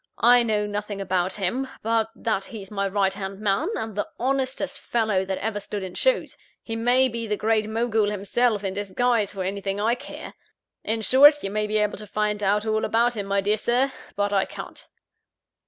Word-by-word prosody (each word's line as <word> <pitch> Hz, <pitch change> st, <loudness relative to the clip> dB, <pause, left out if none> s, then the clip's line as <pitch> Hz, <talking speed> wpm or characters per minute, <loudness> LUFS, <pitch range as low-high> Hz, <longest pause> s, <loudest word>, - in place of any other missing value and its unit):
I 245 Hz, +2 st, +6 dB
know 215 Hz, -3 st, +1 dB
nothing 205 Hz, 0 st, -4 dB
about 185 Hz, -1 st, 0 dB
him, 215 Hz, +7 st, -1 dB, 0.2 s
but 225 Hz, 0 st, +1 dB
that 215 Hz, -4 st, -1 dB
he's 205 Hz, -4 st, -9 dB
my 200 Hz, -1 st, -1 dB
right 195 Hz, -1 st, +1 dB
hand 195 Hz, 0 st, -6 dB
man, 210 Hz, -, +1 dB
and 220 Hz, -2 st, -4 dB
the 205 Hz, -, -1 dB
honestest 270 Hz, +2 st, -1 dB
fellow 215 Hz, -5 st, 0 dB
that 190 Hz, 0 st, -2 dB
ever 215 Hz, 0 st, -2 dB
stood 205 Hz, 0 st, -5 dB
in 185 Hz, -1 st, -6 dB
shoes. -, -, +1 dB, 0.3 s
He 225 Hz, -, -4 dB
may 245 Hz, +3 st, +3 dB
be 230 Hz, -2 st, -4 dB
the 210 Hz, -1 st, -1 dB
Great 215 Hz, 0 st, +1 dB
Mogul 220 Hz, -2 st, +1 dB
himself, 210 Hz, +2 st, 0 dB
in 190 Hz, -1 st, -2 dB
disguise, 205 Hz, +2 st, 0 dB
for 195 Hz, -2 st, -4 dB
anything 195 Hz, +1 st, -2 dB
I 220 Hz, +3 st, +2 dB
care! 245 Hz, -, -8 dB, 0.5 s
In 225 Hz, +1 st, -1 dB
short, 290 Hz, +6 st, +6 dB
you 195 Hz, -, -2 dB
may 210 Hz, 0 st, -1 dB
be 215 Hz, +1 st, 0 dB
able 210 Hz, -1 st, 0 dB
to 210 Hz, -, -9 dB
find 210 Hz, 0 st, -1 dB
out 205 Hz, +2 st, +1 dB
all 220 Hz, 0 st, 0 dB
about 235 Hz, +2 st, +2 dB
him, 200 Hz, -2 st, -4 dB
my 200 Hz, 0 st, +1 dB
dear 205 Hz, +2 st, +1 dB
Sir; 245 Hz, +5 st, +1 dB, 0.2 s
but 205 Hz, 0 st, 0 dB
I 195 Hz, -1 st, +3 dB
can't." -, -, -9 dB
210 Hz, 200 wpm, -24 LUFS, 200-230 Hz, 0.5 s, I